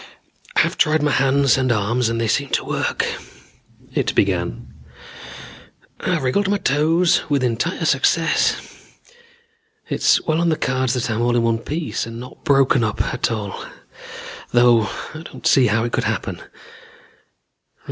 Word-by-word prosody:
"I've - - +1
tried 155 0 +3
my 150 - +2
hands 135 0 +3
and 130 -1 +1
arms 115 +2 0
and 115 0 -2
they 115 - 0
seem 140 +5 0
to - - 0
work," - - -1 0.9
it - - -1
began. - - -1 1.3
"I've 170 -6 -1
wiggled 190 +10 +1
my 205 - +2
toes 165 +2 +2
with 140 -3 +1
entire 125 +8 -1
success. 165 +3 +2 1.3
It's - - +3
well 160 +1 +1
on 170 - +2
the 160 - +2
cards 130 -1 0
that 120 -1 -2
I'm 110 +1 -1
all 120 0 +1
in 120 - +2
one 115 -1 +1
piece 150 +1 -4
and 115 0 -8
not 125 +1 -11
broken 135 -3 +3
up 110 -1 -2
at 125 - -1
all, 105 -3 -5 0.9
though 120 -2 +4 0.2
I 155 - -8
don't 165 - -12
see 130 -2 +5
how 110 +1 +1
it 120 - -2
could - - -1
happen. - - -3
130 Hz, 150 wpm, -20 LUFS, 115-150 Hz, 1.3 s, see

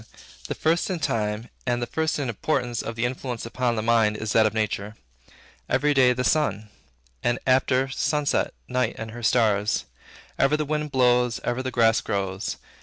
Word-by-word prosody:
The - - -3
first 165 +4 +1
in 185 - -1
time 110 -5 -2
and 120 -1 0
the 120 - -1
first 160 +7 -1
in 140 -3 -2
importance 120 +1 -1
of 115 - -5
the 115 +1 0
influences 125 -2 -4
upon 120 0 -1
the 110 - -2
mind 110 -2 +3
is 110 -1 -3
that 110 -1 +5
of 105 - -3
nature. 105 -1 -2 0.7
Every 145 +4 +2
day, 130 -2 +5
the 125 +1 -1
sun; 110 -9 +1 0.5
and, 120 0 +1
after 130 0 +3
sunset, 145 +2 0
night 125 -2 0
and 110 0 -6
her 120 +1 -8
stars. 110 -3 +2 0.5
Ever 135 +2 +3
the 155 - -1
winds 150 0 -2
blow; 125 -2 +3
ever 120 +2 -1
the 130 - -3
grass 115 -3 +3
grows. 95 -1 -2
120 Hz, 180 wpm, -25 LUFS, 110-135 Hz, 0.7 s, that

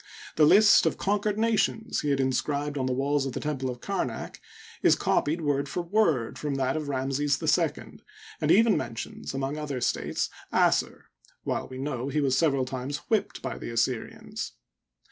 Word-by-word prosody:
The 155 -1 +5
list 205 +5 +7
of - - -1
conquered 205 +1 0
nations 225 0 +1
he 150 - -1
had 140 -1 +1
inscribed 145 +2 -1
on 130 -2 -1
the - - 0
walls 140 +2 0
of 130 - -5
the - - -3
temple 135 -3 -2
of 125 -1 -6
Kamak, 155 - -4 0.4
is - - +5
copied 160 +4 0
word 140 -2 0
for 175 - -2
word, 170 - +1
from 145 -2 -2
that 135 0 0
of 155 -2 -3
Ramses 140 +1 0
II, - - 0 0.4
and - - 0
even 225 -1 +5
men 115 - -3
tions, 125 - -6
among 135 +3 -2
other 145 -4 -3
states, - - -1 0.2
Assur, - - +2 0.4
while - - -2
we 130 - -9
know 130 -2 -3
he 150 +2 0
was 135 -3 +2
several 135 -3 +2
times 130 +2 -4
whipped 220 -2 0
by - - -4
the - - -6
Assyrians. 115 +1 -2
140 Hz, 180 wpm, -27 LUFS, 130-155 Hz, 0.4 s, list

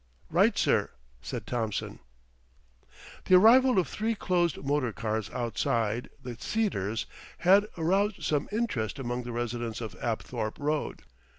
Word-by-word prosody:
"Right, - - +4
sir," - - +2 0.3
said - - -5
Thompson. 110 -4 -3 1.3
The 185 - +6
arrival 245 +6 +7
of 185 - +3
three 225 +1 -1
closed 175 -4 +1
motor 140 -4 +1
cars 110 +1 -3
outside 115 -1 -1
"The 125 -2 -6
Cedars" 115 - -1 0.3
had 195 +4 +5
aroused 195 +5 +1
some 150 -2 0
interest 205 - -1
among 125 -2 -3
the 120 0 -6
residents 120 -1 -3
of 115 -2 -5
Apthorpe 115 -1 -3
Road. 150 +1 -2
125 Hz, 125 wpm, -29 LUFS, 115-185 Hz, 1.3 s, arrival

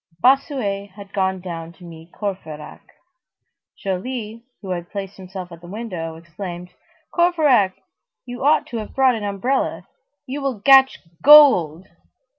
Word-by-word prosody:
Bossuet 250 - +1
had 200 -1 -12
gone 190 -1 -1
down 170 -2 -7
to 180 - -18
meet 165 0 -12
Courfeyrac. 160 -7 -7 1.0
Joly, 220 +3 -5 0.2
who 190 - -5
had 175 -1 -4
placed 200 -1 -6
himself 185 -1 -9
at 170 0 -12
the 175 - -12
window, 180 -6 -6
exclaimed:— 175 +1 -8 0.4
"Courfeyrac, 300 - +3 0.5
you 245 +1 -7
ought 295 +2 +3
to 235 - -6
have 215 -2 -7
brought 265 -1 +4
an 220 -3 -4
umbrella. 205 +7 -2 0.4
You 275 +3 -5
will 270 -6 -2
gatch 265 +4 +6 0.2
gold." 190 - +7
200 Hz, 135 wpm, -21 LUFS, 175-255 Hz, 1.0 s, gold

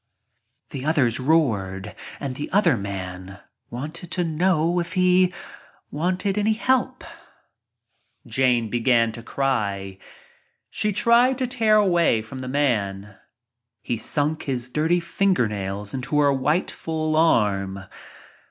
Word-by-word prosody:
The 130 - -5
others 140 -7 +1
roared 105 -10 0 0.3
and 140 -2 -4
the 145 +3 -6
other 185 -7 +3
man 95 -2 -6 0.3
wanted 155 +8 -7
to 180 - 0
know 170 +1 +1
if 170 +1 -4
"he 185 0 +3 0.6
wanted 185 +6 -1
any 215 +1 +2
help?" 255 +2 0 1.2
Jane 125 -3 +1
began 120 -1 +2
to 115 - -8
cry. 100 -7 -2 0.7
She 210 - -1
tried 240 +4 +3
to 260 - -1
tear 225 -3 +2
away 175 - +3
from 120 +4 -9
the 130 - -6
man. 105 -8 -1 0.7
He 120 - -2
sunk 150 +6 0
his 125 -2 -3
dirty 160 +6 +1
fingernails 105 - -1
into 135 +3 -1
her 145 -1 +4
white 150 +7 0
full 155 -1 -3
arm. 100 -11 +2
145 Hz, 120 wpm, -23 LUFS, 110-175 Hz, 1.2 s, her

